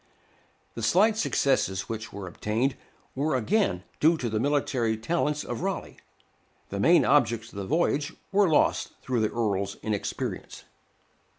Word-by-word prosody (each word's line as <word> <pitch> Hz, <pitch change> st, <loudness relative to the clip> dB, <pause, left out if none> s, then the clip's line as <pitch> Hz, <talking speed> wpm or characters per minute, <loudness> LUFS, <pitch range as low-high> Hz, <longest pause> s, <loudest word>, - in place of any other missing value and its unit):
The -, -, -6 dB
slight 210 Hz, +5 st, +4 dB
successes 135 Hz, -, +1 dB
which 115 Hz, 0 st, -5 dB
were 100 Hz, -2 st, -7 dB
obtained 115 Hz, +8 st, -1 dB, 0.4 s
were 140 Hz, +1 st, 0 dB
again 125 Hz, -, +1 dB, 0.2 s
due 160 Hz, +2 st, +4 dB
to 120 Hz, -6 st, -3 dB
the 110 Hz, -, 0 dB
military 130 Hz, -4 st, 0 dB
talents 150 Hz, +4 st, -1 dB
of 120 Hz, -, -5 dB
Raleigh; 195 Hz, +1 st, -3 dB, 0.7 s
the 100 Hz, -, -4 dB
main 170 Hz, -, +5 dB
objects 115 Hz, -5 st, +2 dB
of 100 Hz, -, -6 dB
the 95 Hz, -, -5 dB
voyage 150 Hz, -2 st, +1 dB, 0.2 s
were 195 Hz, -2 st, +4 dB
lost 155 Hz, -, +2 dB
through 125 Hz, -2 st, -1 dB
the 110 Hz, -1 st, +1 dB
Earl's 100 Hz, -4 st, -1 dB
inexperience. 105 Hz, -1 st, -4 dB
125 Hz, 140 wpm, -27 LUFS, 110-155 Hz, 0.7 s, main